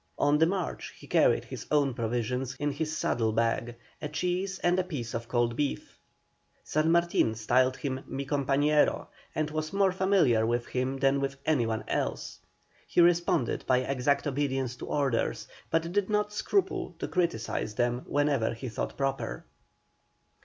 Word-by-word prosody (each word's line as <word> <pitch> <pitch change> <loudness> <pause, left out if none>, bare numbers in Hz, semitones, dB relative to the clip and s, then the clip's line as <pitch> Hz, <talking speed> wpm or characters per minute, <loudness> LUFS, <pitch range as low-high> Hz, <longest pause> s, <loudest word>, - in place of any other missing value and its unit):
On 145 +1 +3
the 160 - +5
march 185 -1 -3
he - - -13
carried - - +3
his - - -8
own 145 -3 +2
provisions 120 +2 -2
in 145 +2 -1
his 155 +2 -3
saddle 115 -6 +1
bags 115 +1 0 0.3
a 150 - -3
cheese 180 +5 -1
and 175 +1 +3
a - - +2
piece 140 -10 -5
of 115 0 -4
cold 120 -1 +1
beef. 145 +1 -3 0.6
San 155 +2 +1
Martin 170 -9 +2
styled 130 +4 +2
him 130 -2 -3
"Mi 140 +1 -4
compañero," 145 +2 +2 0.3
and 155 -1 -1
was 155 0 -3
more 195 -1 +3
familiar 185 - +3
with 120 +1 0
him 130 +1 -2
than 135 0 +2
with 135 0 -2
any 135 -7 +2
one 110 -1 -2
else. - - -2 0.5
He - - 0
responded 170 -7 +3
by 130 0 +4
exact 135 +2 0
obedience 135 -3 -1
to - - -7
orders, 135 -5 0 0.2
but 165 +1 0
did 205 +1 0
not 210 0 0
scruple 390 - 0
to - - -4
criticise 115 - -1
them 120 +2 0
whenever 145 -6 +1
he 125 +2 -6
thought 110 - -4
proper. 135 - -2
140 Hz, 160 wpm, -29 LUFS, 120-160 Hz, 0.6 s, the